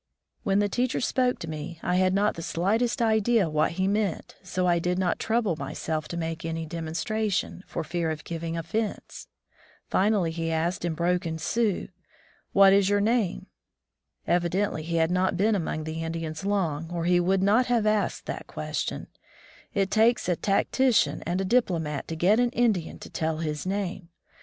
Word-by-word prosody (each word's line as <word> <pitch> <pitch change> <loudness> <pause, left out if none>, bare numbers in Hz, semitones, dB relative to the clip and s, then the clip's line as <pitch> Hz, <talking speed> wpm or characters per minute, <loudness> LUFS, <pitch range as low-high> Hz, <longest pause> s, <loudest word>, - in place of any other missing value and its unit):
When 195 0 +1
the 205 0 +3
teacher 250 +5 0
spoke 250 0 +1
to 165 - -7
me, 160 +2 -6
I 180 - +1
had 185 0 +3
not 205 +3 +2
the 165 - -7
slightest 225 +10 0
idea 220 -2 +3
what 155 +1 +1
he 185 +2 0
meant, 200 -3 -1
so 185 -1 -2
I 175 -1 +3
did 180 +1 -1
not 185 -2 0
trouble 220 -6 +1
myself 155 -1 -3
to 170 - -5
make 165 0 -3
any 165 0 -3
demonstration, 170 +6 -2
for - - -4
fear 170 0 -2
of 155 -1 -4
giving 165 0 -4
offense. 205 +7 -4 0.6
Finally 195 -4 +2
he 165 0 -2
asked 165 +3 -1
in 170 -2 -1
broken 170 -1 0
Sioux: 210 +5 0 0.6
"What 195 -1 +7
is 200 -1 +4
your 205 0 +3
name?'* 215 -3 +1 0.8
Evidently 175 0 0
he 165 +2 -3
had 165 +1 +2
not 185 0 +1
been 215 +4 +3
among 160 -5 -2
the 160 +1 -4
Indians 165 0 -4
long, 165 -6 -1
or 170 -1 -2
he 175 0 +4
would 190 +2 +2
not 220 +6 +4
have 235 -3 +2
asked 215 -1 0
that - - -5
ques - - -5
tion. - - -3 0.7
It 195 -2 +1
takes 225 +2 +3
a 180 - +2
tactician 210 - +2
and 175 +2 0
a 195 - 0
diplomat 170 - 0
to 165 - -4
get 190 +8 +3
an 245 0 +3
Indian 215 -9 +1
to - - -11
tell 160 0 -1
his 155 +1 -3
name! 190 -2 -3
180 Hz, 180 wpm, -27 LUFS, 165-205 Hz, 0.8 s, What